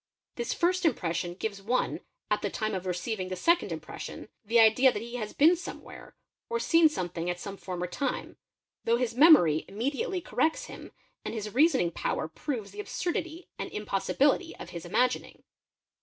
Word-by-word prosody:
is 240 Hz, 0 st, -3 dB
first 365 Hz, +2 st, +1 dB
impression 175 Hz, -, 0 dB
gives 200 Hz, +1 st, -4 dB
one, 240 Hz, +6 st, 0 dB, 0.3 s
at -, -, +2 dB
the -, -, -1 dB
time 215 Hz, -1 st, -2 dB
of 185 Hz, -1 st, -3 dB
receiving 185 Hz, +2 st, -2 dB
the 185 Hz, -, -3 dB
second 340 Hz, -, +2 dB
impres -, -, -6 dB
n, -, -, -10 dB
the 230 Hz, +2 st, +3 dB
idea 230 Hz, +4 st, +6 dB
that 210 Hz, -, -4 dB
he 235 Hz, +1 st, -6 dB
has 215 Hz, -3 st, -4 dB
been 325 Hz, +5 st, +5 dB
somewhere, 355 Hz, -, -10 dB, 0.3 s
or 465 Hz, 0 st, 0 dB
seen 330 Hz, -6 st, +5 dB
something 175 Hz, -, -3 dB
at 175 Hz, 0 st, -2 dB
some, 200 Hz, +1 st, -7 dB
ne 180 Hz, -1 st, -2 dB
time, 275 Hz, +10 st, -3 dB, 0.5 s
though 230 Hz, +1 st, +3 dB
his 240 Hz, -2 st, -1 dB
memory 245 Hz, -, +6 dB
immediately 285 Hz, -, -2 dB
corrects 320 Hz, -2 st, 0 dB
him -, -, -10 dB, 0.3 s
and -, -, -4 dB
his 210 Hz, -1 st, -5 dB
reasoning 265 Hz, -, +4 dB
power 155 Hz, -, -2 dB
proves 210 Hz, -, -5 dB
the.absurdity 320 Hz, -, -4 dB
and -, -, -4 dB
impossibility 265 Hz, -, +1 dB
of -, -, -10 dB
his 170 Hz, -1 st, -7 dB
imagining. 250 Hz, +8 st, 0 dB
230 Hz, 170 wpm, -29 LUFS, 185-300 Hz, 0.5 s, idea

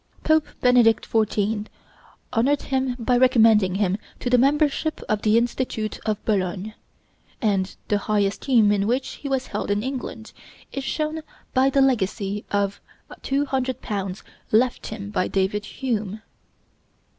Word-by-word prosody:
Pope 315 Hz, -1 st, +3 dB
Benedict 245 Hz, -3 st, +4 dB
XIV. 215 Hz, -1 st, 0 dB, 0.7 s
honored 265 Hz, +5 st, +2 dB
him 260 Hz, -2 st, -1 dB
by 245 Hz, +1 st, +1 dB
recommending 225 Hz, -6 st, +5 dB
him 195 Hz, 0 st, 0 dB, 0.2 s
to 245 Hz, -, -3 dB
the 250 Hz, -, +6 dB
membership 295 Hz, +3 st, +2 dB
of 215 Hz, -2 st, 0 dB
the 215 Hz, +1 st, +3 dB
Institute 235 Hz, -2 st, -1 dB
of 215 Hz, -1 st, +1 dB
Bologne; 195 Hz, 0 st, -1 dB, 0.7 s
and 200 Hz, -5 st, 0 dB
the 205 Hz, -, +1 dB
high 210 Hz, 0 st, +1 dB
esteem 210 Hz, +2 st, +3 dB
in 200 Hz, 0 st, +1 dB
which 255 Hz, +3 st, 0 dB
he 280 Hz, -, -7 dB
was 265 Hz, -1 st, 0 dB
held -, -, -4 dB
in 205 Hz, +1 st, 0 dB
England 255 Hz, -4 st, -5 dB, 0.4 s
is 275 Hz, -, -4 dB
shown 305 Hz, +3 st, -2 dB, 0.3 s
by 265 Hz, +1 st, +4 dB
the 275 Hz, 0 st, +3 dB
legacy 210 Hz, -5 st, 0 dB
of 200 Hz, -1 st, -1 dB, 0.3 s
£200 255 Hz, -8 st, -2 dB, 0.3 s
left 240 Hz, +3 st, +2 dB
him 205 Hz, -1 st, -6 dB
by 185 Hz, -, 0 dB
David 200 Hz, +2 st, 0 dB
Hume. 215 Hz, -5 st, -3 dB
225 Hz, 135 wpm, -23 LUFS, 205-260 Hz, 0.7 s, the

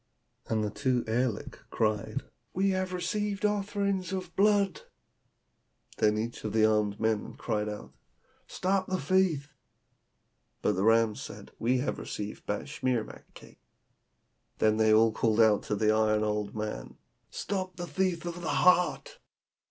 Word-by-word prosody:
And 110 Hz, -1 st, 0 dB
the 105 Hz, -, -2 dB
two 125 Hz, +1 st, 0 dB
aerliks 115 Hz, 0 st, -1 dB
(fiends) -, -, -25 dB
cried, 110 Hz, -2 st, -1 dB, 0.3 s
'We 195 Hz, +1 st, +2 dB
have 185 Hz, -1 st, -1 dB
received 200 Hz, +3 st, -2 dB
offerings 200 Hz, -3 st, 0 dB
of 185 Hz, -3 st, -5 dB
blood!' 200 Hz, -1 st, +3 dB, 1.2 s
Then 105 Hz, 0 st, +3 dB
each 115 Hz, +2 st, -4 dB
of 110 Hz, -, -3 dB
the 110 Hz, -1 st, +4 dB
armed 105 Hz, -1 st, +1 dB
men 110 Hz, -2 st, -1 dB
cried 105 Hz, 0 st, -2 dB
out, 105 Hz, 0 st, -8 dB, 0.5 s
'Stop 190 Hz, +1 st, 0 dB
the 185 Hz, 0 st, -1 dB
thief!' 155 Hz, -3 st, +1 dB, 1.1 s
But -, -, +3 dB
the 95 Hz, -, -1 dB
rams 115 Hz, 0 st, +3 dB
said, -, -, -9 dB
'We 125 Hz, +3 st, +2 dB
have -, -, -2 dB
received 105 Hz, 0 st, -6 dB
batschimak 125 Hz, +1 st, -2 dB
cakes.' -, -, -15 dB, 1.0 s
Then 110 Hz, 0 st, +3 dB
they 110 Hz, 0 st, +4 dB
called 110 Hz, 0 st, +3 dB
out 110 Hz, -2 st, +5 dB
to 105 Hz, -, -1 dB
the 110 Hz, +1 st, +3 dB
iron 110 Hz, 0 st, +2 dB
old 105 Hz, -1 st, -2 dB
man, 105 Hz, -, -5 dB, 0.3 s
'Stop 185 Hz, -3 st, -3 dB
the 175 Hz, 0 st, -5 dB
thief 180 Hz, -2 st, -1 dB
with 175 Hz, 0 st, -5 dB
the 160 Hz, -, -3 dB
heart!' 180 Hz, -, +3 dB
120 Hz, 145 wpm, -29 LUFS, -, 1.2 s, out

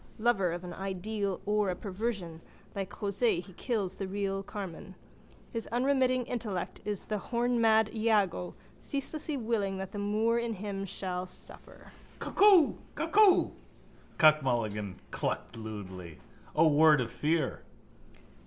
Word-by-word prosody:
Lover 215 Hz, -6 st, +2 dB
of 175 Hz, +1 st, -5 dB
an 175 Hz, -1 st, -6 dB
ideal 195 Hz, +1 st, -3 dB
or 210 Hz, -1 st, +2 dB
a 180 Hz, -, -1 dB
perversion, 190 Hz, -4 st, -4 dB, 0.3 s
like 195 Hz, -1 st, -3 dB
José 200 Hz, 0 st, 0 dB
he 185 Hz, +1 st, -10 dB
kills 210 Hz, -4 st, -2 dB
the 195 Hz, -, -3 dB
real 195 Hz, 0 st, -2 dB
Carmen. 190 Hz, -2 st, -7 dB, 0.6 s
His 230 Hz, -1 st, -3 dB
unremitting 255 Hz, 0 st, +2 dB
intellect 215 Hz, -8 st, -4 dB
is 205 Hz, -2 st, -3 dB
the 210 Hz, -1 st, -2 dB
hornmad 230 Hz, -2 st, +2 dB
Iago 205 Hz, -, +1 dB, 0.2 s
ceaselessly 290 Hz, +1 st, -3 dB
willing 220 Hz, -5 st, -1 dB
that 190 Hz, 0 st, -5 dB
the 205 Hz, -, -5 dB
moor 215 Hz, +3 st, +1 dB
in 235 Hz, -1 st, -2 dB
him 195 Hz, 0 st, -4 dB
shall 185 Hz, -1 st, -4 dB
suffer. -, -, -12 dB, 0.3 s
—Cuckoo! 390 Hz, -7 st, +5 dB, 0.2 s
Cuckoo! 415 Hz, -3 st, +5 dB, 0.7 s
Cuck 155 Hz, -1 st, +6 dB
Mulligan 105 Hz, -7 st, -1 dB, 0.2 s
clucked -, -, -3 dB
lewdly. 95 Hz, -7 st, -8 dB, 0.4 s
O 160 Hz, +2 st, +6 dB
word 155 Hz, 0 st, +6 dB
of 115 Hz, -2 st, -2 dB
fear! 160 Hz, +1 st, 0 dB
200 Hz, 130 wpm, -30 LUFS, 175-230 Hz, 0.7 s, Cuck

